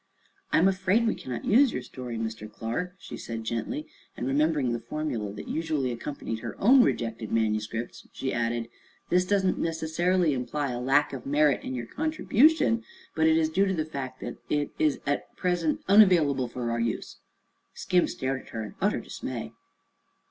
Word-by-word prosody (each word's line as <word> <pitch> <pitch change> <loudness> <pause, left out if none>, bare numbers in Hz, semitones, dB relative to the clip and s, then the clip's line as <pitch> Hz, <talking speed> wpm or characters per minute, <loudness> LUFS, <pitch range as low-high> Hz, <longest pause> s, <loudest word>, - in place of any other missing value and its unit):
"I'm 175 - +5
afraid 195 +4 +2
we 225 - +2
cannot 125 -2 -6
use 255 +4 +5
your - - -4
story, 125 -3 -6
Mr. 110 -1 -5
Clark," 170 - -4
she - - -9
said 115 -1 -5
gently, 120 - -3 0.3
and - - -3
remembering 140 -2 +1
the 120 - -2
formula 115 -4 -3
that 105 - -8
usually 155 -5 -1
accompanied 120 -2 -5
her 115 0 -6
own 255 +6 +7
rejected 115 - -1
manuscripts 110 +1 -1
she 130 - -3
added: 115 0 -1 0.4
"This 180 +1 +3
does 200 0 +2
not 185 - +1
necessarily 165 +1 +1
imply 135 +2 -2
a 120 - -3
lack 135 +3 +3
of 135 - -6
merit 145 -1 +3
in 130 - -4
your 120 -1 -4
contribution, 310 - +2 0.3
but 160 0 +3
is 160 0 +4
due 190 +5 +2
to 190 - 0
the 155 -2 -1
fact 135 -4 -6
that - - -5
it 145 -1 0
is 150 -2 +2
at 145 0 -2
present 175 -4 0
unavailable 175 - +5
for 120 0 -3
our 115 - -1
use." 115 -1 -2 0.6
Skim 180 -2 +2
stared 130 0 -3
at - - -17
her 110 - -4
in 105 - -8
utter - - +2
dismay. - - -6
145 Hz, 175 wpm, -27 LUFS, 120-180 Hz, 0.6 s, own